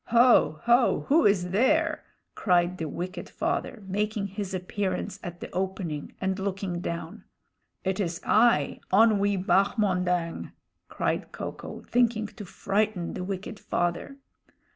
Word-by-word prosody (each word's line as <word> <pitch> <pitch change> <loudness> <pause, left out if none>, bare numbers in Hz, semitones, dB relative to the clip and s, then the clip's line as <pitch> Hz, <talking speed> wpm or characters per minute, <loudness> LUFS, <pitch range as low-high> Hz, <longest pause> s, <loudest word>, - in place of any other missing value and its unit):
"Ho! 235 -9 +5
ho! 240 +1 +3
who 300 -3 +5
is 180 -3 +1
there?" 305 - +2 0.3
cried 180 -2 +1
the 160 -2 -3
wicked 180 +3 -5
father, 215 - -2
making 210 +2 -1
his 200 0 -5
appearance 190 +1 -3
at 175 -1 -8
the - - -7
opening 185 -5 -3
and 190 0 -1
looking 190 -2 -3
down. 170 -1 -5 0.6
"It 190 0 -1
is 170 -3 -1
I, 220 -10 +3
Onwee 200 -2 +4
Bahmondang!" 180 -4 +1 0.4
cried - - -2
Ko - - -5
ko, - - -9
thinking 235 -3 +2
to 210 0 -9
frighten 200 -1 -1
the - - -4
wicked 195 +2 -5
father. 175 +10 -2
195 Hz, 130 wpm, -27 LUFS, 180-215 Hz, 0.6 s, Ho